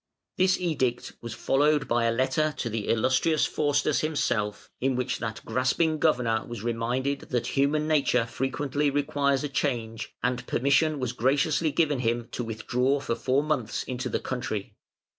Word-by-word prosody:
This 185 0 +3
edict 135 -9 -1
was 115 -2 -6
followed 145 +1 +2
by 120 0 +2
a 115 - +3
letter 130 +5 +1
to 115 - -3
the 110 -1 -3
Illustrious 130 +7 +2
Faustus 145 -2 +1
himself, 120 -9 -1
in 130 0 +1
which 125 0 -1
that 110 -1 -5
grasping 155 +5 +1
governor 120 -8 +2
was 120 -3 -7
reminded 120 +4 -1
that 120 -2 -2
human 145 +2 +2
nature 135 -6 +2
frequently 135 +4 -1
requires 140 -1 +1
a - - 0
change, 120 -5 -3
and 125 0 -1
permission 140 +3 +2
was 125 -2 -2
graciously 145 +5 +1
given 150 -4 +1
him 120 -1 -1
to 120 - -3
withdraw 125 +5 0
for 135 - -2
four 130 +4 +1
months 140 -8 -1
into 125 0 -4
the - - -1
country. 110 -6 -4
130 Hz, 160 wpm, -27 LUFS, 120-145 Hz, -, This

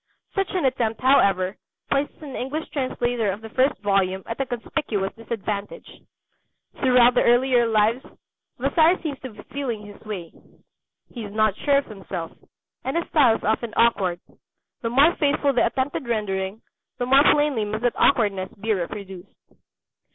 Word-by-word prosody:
Such 390 -2 -1
an 360 - +1
attempt, 230 -4 0
however, 195 -8 +3 0.4
places 285 +2 -1
an 280 -3 -7
English 290 +5 -4
translator 245 -5 -1
of 200 +3 -7
the 225 - -9
first 265 +4 +2
volume 190 -2 +1
at 230 +4 -4
a 270 - -2
conspicuous 230 -5 -3
disadvantage. 215 -3 -5 0.9
Throughout 250 -2 +5
the - - +3
earlier 245 0 +4
Lives 225 +3 +2 0.5
Vasari 335 +2 +3
seems 290 -4 -4
to 260 - -7
be 210 -2 -13
feeling 240 -7 -3
his 205 0 -13
way. 190 -6 -7 0.8
He 235 - -6
is 205 - -7
not 215 -1 +2
sure 280 +3 +2
of 280 - 0
himself, 190 -5 -7 0.5
and 265 +5 -2
his 335 - -2
style 260 -8 +4
is - - -7
often 220 +1 -1
awkward. 195 -7 +2 0.6
The 230 - -2
more 280 +8 +5
faithful 285 -1 +2
the 245 - +3
attempted 260 +2 -2
rendering, 205 -2 -2 0.3
the 245 - -1
more 270 +2 +6
plainly 290 -6 +1
must 215 +2 -4
that 245 - +2
awkwardness 200 -7 +2
be 220 +2 0
reproduced. 190 0 -6
230 Hz, 160 wpm, -23 LUFS, 205-270 Hz, 0.9 s, more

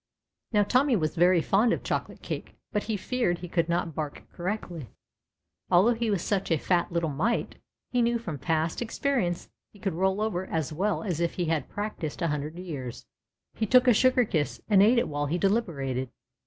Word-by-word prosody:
Now 210 -2 +4
Tommy 255 +5 +3
was 155 -6 0
very 175 0 +5
fond 220 +4 +3
of - - -1
chocolate - - -3
cake^ - - -5 0.2
but 210 -2 -1
he 220 -2 -1
feared 215 -4 0
he 180 - -7
could 170 -1 0
not 170 -1 0
bark 150 -1 -5
correctly, 175 - -4 0.8
although 190 +7 +5
he 230 0 -1
was 200 -5 0
such 195 -2 -1
a 165 - +3
fat 175 +4 +1
little 170 -2 0
mite 200 +13 -1 0.3
he 245 - +2
knew 235 0 +2
from 175 - -6
past 160 - 0
experience 235 -6 -1 0.2
he - - -18
could 195 -3 -2
roll 190 +3 +1
over 190 -4 -1
as 160 -2 -2
well 200 +8 0
as 180 -7 -2
if 170 0 0
he 175 - -1
had 160 -4 -1
practised 205 -6 -4
a 165 - +1
hundred 150 +2 -3
years. 145 -10 -6 0.5
He 220 - -2
took 250 +3 +5
a 245 - +7
sugar 255 +2 +4
kiss 155 -8 -1
and 200 -3 +5
ate 225 +5 +5
it 235 - +2
while 145 0 -2
he 165 +5 0
deliberated. 150 - 0
180 Hz, 195 wpm, -27 LUFS, 160-220 Hz, 0.8 s, a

